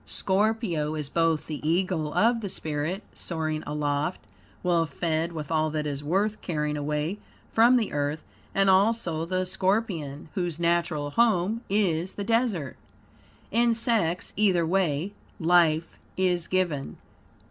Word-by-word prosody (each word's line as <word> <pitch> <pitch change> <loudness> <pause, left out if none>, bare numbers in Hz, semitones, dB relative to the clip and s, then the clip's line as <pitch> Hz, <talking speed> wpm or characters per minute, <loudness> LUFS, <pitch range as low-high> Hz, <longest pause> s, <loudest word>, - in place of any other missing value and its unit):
Scorpio 190 -6 0
is 150 -2 -4
both 165 -1 +1
the 155 -2 -5
eagle 165 -1 0
of 230 +1 +3
the 205 -3 -4
spirit, 155 +5 -3
soaring 155 -2 -3
aloft, 150 +2 -1 0.4
well 170 -2 +2
fed 160 +2 -1
with 155 -2 -6
all 155 -1 +2
that 155 0 -2
is 145 -1 -3
worth 200 +7 0
carrying 150 -3 -2
away 150 +6 -2 0.3
from 235 +3 +6
the 225 -4 -1
earth; 145 +1 -1 0.3
and 195 0 +3
also 190 -4 +2
the 185 +1 -1
scorpion, 185 -6 -1
whose 175 -4 -2
natural 170 -4 0
home 220 +1 +2
is 185 -3 +1
the 200 - -4
desert. 220 - 0 0.7
In 235 +1 +3
sex, 220 -7 0
either 185 -5 +3
way, 175 0 0 0.3
life 165 -2 +3 0.3
is 180 -2 +1
given. 175 -7 -1
170 Hz, 135 wpm, -27 LUFS, 155-195 Hz, 0.7 s, from